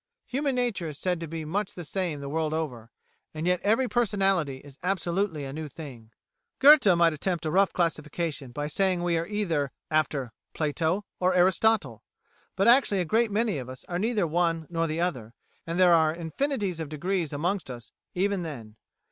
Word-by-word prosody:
Human 275 +1 -1
nature 240 -9 -1
is 145 - -8
said 180 +1 -1
to 165 - -5
be 160 0 -5
much 195 +6 -2
the 175 - -7
same 170 -4 -2
the 140 - -6
world 155 +1 -1
over, 125 -8 -4 0.5
and 155 +1 -3
yet 180 0 +2
every 225 +5 +2
personality 195 - +1
is 140 0 -15
absolutely 180 -3 -1
a 135 - -6
new 155 +1 -5
thing. 130 -6 -10 0.5
Goethe 290 -4 +7
might 170 -1 +4
attempt 170 +2 -2
a 155 - -1
rough 195 +3 +3
classification 155 -4 -2
by 145 +4 -4
saying 180 +3 0
we 175 -1 +1
are 165 - -4
either 170 -10 -1 0.8
Platonists 160 +5 0 0.2
or 185 0 +2
Aristotelians, 180 - +2 0.5
but 195 +3 +2
actually 235 -6 +5
a - - -1
great 225 +6 +2
many 210 -5 0
of 125 -1 -7
us 130 0 -10
are 175 0 -3
neither 215 -2 +1
one 165 0 0
nor 165 -1 0
the 155 +1 -3
other, 125 -10 -2 0.3
and 165 +2 -2
there 180 -2 +6
are 160 -2 +4
infinities 185 - -2
of 160 -3 -4
degrees 170 +2 -2
amongst 175 +4 -2
us 120 -2 -9 0.2
even 195 +1 0
then. 115 -10 -8
170 Hz, 180 wpm, -27 LUFS, 150-195 Hz, 0.8 s, Goethe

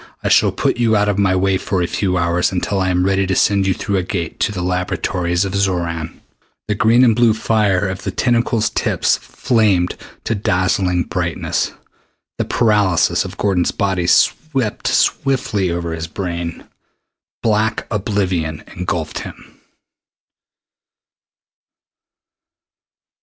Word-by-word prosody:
I - - 0
shall - - +4
put - - -1
you 115 -2 +2
out 105 0 +2
of 100 0 0
my 95 -2 +3
way 95 0 +1
for 95 - -2
a 90 - +1
few 95 0 -1
hours 85 +1 +1
until 95 +2 -1
I 95 -1 +1
am 90 0 +1
ready 95 0 +1
to 95 - 0
send 100 0 +2
you 95 - +1
through 100 - -2
the - - +1
Gate 85 -3 -4
to - - +1
the 90 -4 -4
laboratories 90 0 -1
of 95 - -4
Xoran." 85 -5 -2 0.5
The 105 - +1
green 110 +5 +4
and 115 -3 +4
blue 115 -2 +4
fire 105 -3 +1
of 95 0 -5
the - - -3
tentacle's 115 +1 +1
tips - - +1
flamed 100 -7 +1 0.3
to - - -1
dazzling 95 -2 +1
brightness. - - -2 0.7
The - - 0
paralysis 100 -6 +2
of 95 0 -8
Gordon's 95 -4 +1
body 95 -3 -1
swept 135 - +1
swiftly 130 -8 +1
over 85 -1 -3
his 80 -1 -4
brain. 85 -2 -5 0.8
Black 110 0 +1
oblivion 95 -7 -1
engulfed 85 -3 -3
him. - - -11
95 Hz, 140 wpm, -18 LUFS, 90-105 Hz, 0.8 s, shall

